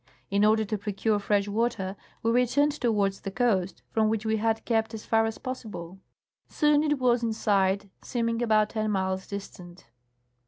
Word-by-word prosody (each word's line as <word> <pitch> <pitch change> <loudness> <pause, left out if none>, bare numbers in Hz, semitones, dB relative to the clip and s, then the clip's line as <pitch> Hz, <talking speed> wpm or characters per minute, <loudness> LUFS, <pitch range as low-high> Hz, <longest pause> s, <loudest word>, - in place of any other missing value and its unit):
In 200 +1 +3
order 220 +1 +4
to 210 0 -3
procure 210 +1 0
fresh 205 0 +1
water, 205 -3 -1 0.3
we 225 - +2
returned 250 +5 +3
towards 210 -8 0
the - - -4
coast, 195 -4 0
from 220 -1 +2
which 220 0 -1
we 220 0 +1
had 225 +1 0
kept 225 -1 0
as 215 - -8
far 225 0 +3
as 225 - -5
possible. 210 -9 -7 0.5
Soon 295 -1 +3
it 295 -1 +1
was 245 -2 +2
in 230 -1 0
sight, 200 -2 +1
seem 235 -2 -2
ing 230 0 -1
about 215 -2 +3
ten 215 -1 -1
miles 190 -2 -1
distant. 180 -8 -9
220 Hz, 180 wpm, -27 LUFS, 200-230 Hz, 0.5 s, order